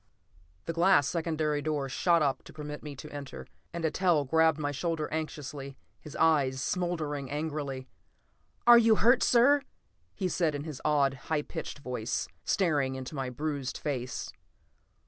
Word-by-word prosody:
The 165 - -2
glass 170 -3 +4
secondary 155 -3 -1
door 145 -2 -1
shot 170 +4 +2
up 140 -2 0
to - - -12
permit 150 -1 -7
me 150 -2 -7
to 150 +3 -10
enter, 140 - -7 0.3
and 170 -1 -5
Eitel 160 -1 +2
gripped 160 +1 +4
my 145 -2 -2
shoulder 160 +1 -2
anxiously, 145 -3 -5 0.2
his 150 - -11
eyes 140 -5 +3
smoldering 155 -4 -2
angrily. 145 -3 -3 0.8
"You're 235 -2 +8
hurt, 240 +4 +4
sir!" 275 +4 +5 0.5
he 190 - -1
said 165 -3 0
in 145 - -4
his 150 -4 -7
odd, 145 -3 +3 0.2
high 155 -2 +1
pitched - - -6
voice, 125 -5 -3 0.2
staring 145 -8 +1
into 130 +2 -6
my 135 -3 -3
bruised 140 0 -3
face. 130 -4 -4
150 Hz, 145 wpm, -29 LUFS, 140-165 Hz, 0.8 s, You're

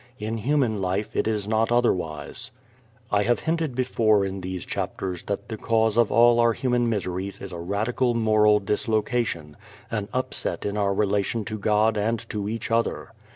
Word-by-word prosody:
In 110 +2 -3
human 120 -4 +1
life 95 +3 -2
it - - +1
is 105 -2 -1
not 110 +1 +1
otherwise. 90 -11 0 0.6
I 100 - +3
have 120 +4 +1
hinted 160 -5 -1
before 110 -5 +2
in 95 0 -4
these 90 -1 -5
chapters 90 -2 -3
that 100 - -3
the 110 - -5
cause 110 -1 +1
of 120 -2 +3
all 120 0 +5
our 115 0 +4
human 120 -1 +1
miseries 95 -2 -3
is 95 - -7
a 85 - -5
radical 110 +7 0
moral 110 -2 +4
dislocation, 105 -6 -1 0.3
an 105 -3 -2
upset 130 0 -2
in 100 0 -2
our 100 -2 +1
relation 105 +2 0
to 110 +2 -5
God 105 +1 +2
and 115 +2 0
to 105 -1 -3
each 115 +1 -4
other. 115 0 0
110 Hz, 170 wpm, -25 LUFS, 100-115 Hz, 0.6 s, all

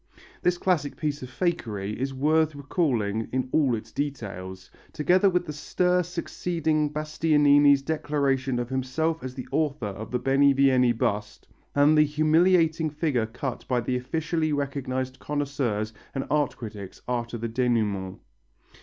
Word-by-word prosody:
This 180 0 +2
classic 170 -6 0
piece 150 -2 -2
of 130 - -7
fakery 110 - -2
is 135 +2 -2
worth 155 +3 +2
recalling 125 - -1
in 130 0 -1
all 140 -6 +3
its 110 +1 -8
details, 95 -10 -5 0.2
together 180 +6 +3
with 180 -1 0
the 150 - -5
stir 180 +4 +1
succeeding 165 -3 -1
Bastianini's 145 -2 +4
declaration 140 -4 0
of 120 -1 -2
himself 145 +5 -1
as 130 -1 -6
the 130 - -7
author 150 -6 0
of 105 +2 -6
the 125 - 0
Benivieni 135 -2 +4
bust 105 -3 -2 0.3
and 145 +2 +5
the 150 - +6
humiliating 160 +2 +3
figure 145 -7 -1
cut 120 +2 -5
by 125 -2 +1
the 125 +2 -1
officially 155 +5 -1
recognized 130 -2 -3
connoisseurs 135 -7 -2 0.2
and 135 - -2
art 150 -2 +1
critics 105 -4 -9
after 120 -1 -2
the 115 +1 -3
dénouement. 110 -6 0
140 Hz, 140 wpm, -26 LUFS, 120-155 Hz, 0.3 s, the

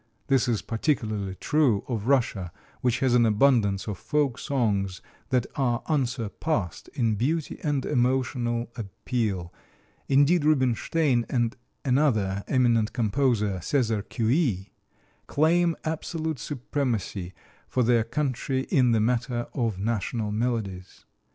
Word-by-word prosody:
This 135 -2 +3
is 115 -4 0
particularly 110 -6 -1
true 135 -5 +2
of 115 -3 -3
Russia, 115 -10 +1 0.3
which 125 +2 +1
has 130 -2 +3
an 120 -1 +5
abundance 110 -3 +3
of 105 - -4
folk 130 +3 0
songs 105 -10 0 0.3
that 125 -3 +2
are 120 -4 0
unsurpassed 120 - -2
in 115 -5 +1
beauty 145 +9 -1
and 145 -3 0
emotional 125 -2 0
appeal; 100 -4 -3 0.6
indeed, 145 +4 +4
Rubinstein 135 -1 +2
and 120 -2 0 0.3
another 110 -8 +2
eminent 120 -4 +2
composer, 110 -4 +1
César 115 - 0
Cui 115 - -2
(kwee), 115 - +1 0.6
claim 165 +3 +3
absolute 160 -1 -3
supremacy 120 - -3 0.3
for 125 - +1
their 120 -1 +3
country 130 +1 -1
in 125 -3 +4
the 110 - +3
matter 120 +1 0
of 115 -7 -1
national 110 +1 -2
melodies. 105 -5 -3
120 Hz, 120 wpm, -26 LUFS, 110-135 Hz, 0.6 s, an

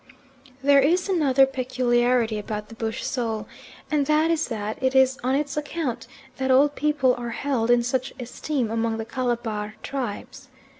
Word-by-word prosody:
There 280 0 +6
is 340 +7 +2
another 280 -8 +4
peculiarity 245 -3 +1
about 210 0 -5
the - - -10
bush 225 0 -3
soul, 225 -4 -2 0.5
and 290 -2 +1
that 310 +2 +3
is 325 -1 0
that 215 -1 -4
it 260 0 +1
is 265 0 +4
on 260 +2 +1
its 285 0 -2
account 290 -6 -3 0.3
that 265 0 -1
old 280 +3 +5
people 295 -4 +2
are 240 -1 -4
held 240 -1 -1
in 240 0 +4
such 255 +2 -1
esteem 250 0 -3
among 225 0 -1
the 225 - -4
Calabar 230 -4 -3
tribes. 260 +1 -5
255 Hz, 160 wpm, -24 LUFS, 230-280 Hz, 0.5 s, There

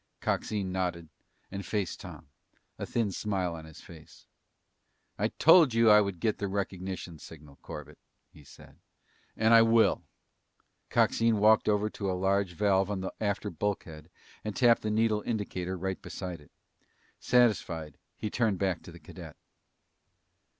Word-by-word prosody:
Coxine 100 -4 -2
nodded 90 -3 -3 0.4
and 100 0 -5
faced 100 -5 -3
Tom, - - -11 0.5
a - - -4
thin 115 -4 0
smile 95 -3 -2
on 80 -1 -8
his 80 -1 -13
face. 80 -2 -15 0.9
"I - - +2
told 160 -7 +5
you 115 -1 +6
I 105 0 +8
would 100 -4 -3
get 110 +3 0
the 100 - -2
recognition 95 -3 -4
signal, 75 -3 -13
Corbett," 75 0 -10 0.3
he 75 - -16
said. - - -17 0.6
"And 110 +1 +4
I 115 - +9
will!" 115 0 +4 0.9
Coxine 115 -1 +2
walked 110 +1 +4
over 105 0 +2
to 100 -2 -4
a 90 - -1
large 95 0 +1
valve 95 +1 +2
on 100 -2 -3
the 95 - -5
after 105 0 -1
bulkhead 85 -4 -4 0.3
and 105 -1 -4
tapped 120 -2 +4
the 110 - -2
needle 110 0 +1
indicator 95 -5 -3
right 95 +1 -4
beside 90 -4 -7
it. 75 - -19 0.7
Satisfied, 90 - +1 0.2
he 105 - -4
turned 110 -5 +1
back 95 -2 -1
to - - -12
the - - -13
cadet. - - -11
100 Hz, 150 wpm, -29 LUFS, 90-110 Hz, 0.9 s, I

